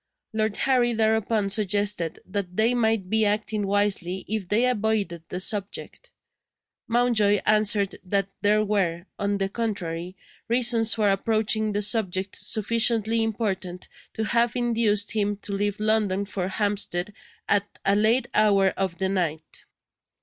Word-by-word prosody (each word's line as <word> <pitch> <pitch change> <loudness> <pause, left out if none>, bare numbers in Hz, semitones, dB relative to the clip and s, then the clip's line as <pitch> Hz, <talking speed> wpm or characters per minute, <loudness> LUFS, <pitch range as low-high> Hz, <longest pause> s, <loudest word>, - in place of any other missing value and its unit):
Lord 215 -1 -1
Harry 250 -3 +2
thereupon 220 -2 +1
suggested 205 -4 0
that 185 -2 -5
they 225 +3 +3
might 225 -5 +1
be 220 +3 +2
acting 210 0 -1
wisely 195 -2 0
if 215 -3 -3
they 220 +6 +2
avoided 215 -7 -1
the 180 - -4
subject. 205 - -4 0.8
Mountjoy 230 -4 +2
answered 210 -2 +2
that 195 +1 0
there 210 +1 +3
were, 185 -4 -1
on 200 0 0
the 195 -1 -1
contrary, 185 -5 -4 0.3
reasons 235 -1 +3
for 210 -3 +2
approaching 215 +1 +1
the 205 +1 0
subject 195 -3 0
sufficiently 225 +1 +1
important 195 -5 -3 0.3
to 220 - -2
have 235 +1 +1
induced 225 -4 +1
him 205 -1 -1
to 205 0 -6
leave 205 +1 -1
London 210 -2 +1
for 190 -2 -4
Hampstead 200 -1 -1 0.3
at 205 0 0
a 195 +1 +3
late 230 +4 +2
hour 200 -2 +4
of 190 -3 -3
the 190 - -1
night. 170 -5 -3
205 Hz, 135 wpm, -25 LUFS, 195-220 Hz, 0.8 s, hour